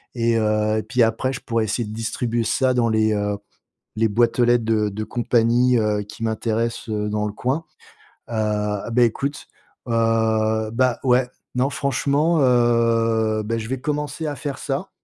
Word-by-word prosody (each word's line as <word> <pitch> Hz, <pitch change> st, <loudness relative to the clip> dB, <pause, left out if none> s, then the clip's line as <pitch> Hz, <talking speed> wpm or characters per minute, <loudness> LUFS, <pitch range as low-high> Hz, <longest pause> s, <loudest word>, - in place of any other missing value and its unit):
et 115 Hz, -1 st, +1 dB
heu, 110 Hz, 0 st, +1 dB
puis 125 Hz, -2 st, +3 dB
après, 115 Hz, +4 st, 0 dB
je -, -, -5 dB
pourrais 115 Hz, -2 st, -1 dB
essayer 110 Hz, +2 st, -2 dB
de 105 Hz, -, -7 dB
distribuer 115 Hz, +1 st, -2 dB
ça 130 Hz, +3 st, +1 dB
dans 120 Hz, -2 st, +2 dB
les, 110 Hz, 0 st, +2 dB
heu, 105 Hz, -1 st, -1 dB, 0.6 s
les 110 Hz, +1 st, +2 dB
boîtes 120 Hz, +4 st, +1 dB
aux 120 Hz, -, +5 dB
lettres 120 Hz, -1 st, +3 dB
de 110 Hz, -2 st, +1 dB
de 105 Hz, +2 st, -5 dB
compagnies, 120 Hz, +2 st, +2 dB
heu, 105 Hz, -1 st, 0 dB
qui 105 Hz, +2 st, -10 dB
m'intéressent, 115 Hz, +1 st, -2 dB
heu, 105 Hz, -1 st, -2 dB
dans 105 Hz, 0 st, -1 dB
le 105 Hz, -, -4 dB
coin, 135 Hz, +9 st, -2 dB, 0.7 s
heu, -, -, -4 dB
heu, 105 Hz, -1 st, -1 dB
bah 125 Hz, +2 st, +3 dB
écoute, 140 Hz, +6 st, -1 dB, 0.4 s
heu, 110 Hz, -1 st, +1 dB
bah, 125 Hz, +1 st, +1 dB
ouais. 125 Hz, -1 st, +3 dB, 0.3 s
Non 130 Hz, +2 st, +2 dB
franchement, 140 Hz, +5 st, +1 dB
heu, 115 Hz, -3 st, +2 dB
bah 115 Hz, +2 st, -2 dB
je 110 Hz, -, -6 dB
vais 130 Hz, -, -2 dB
commencer 150 Hz, +1 st, -3 dB
à 145 Hz, -, -3 dB
faire 145 Hz, -1 st, -5 dB
ça. 145 Hz, +7 st, -3 dB
115 Hz, 175 wpm, -22 LUFS, 110-125 Hz, 0.7 s, aux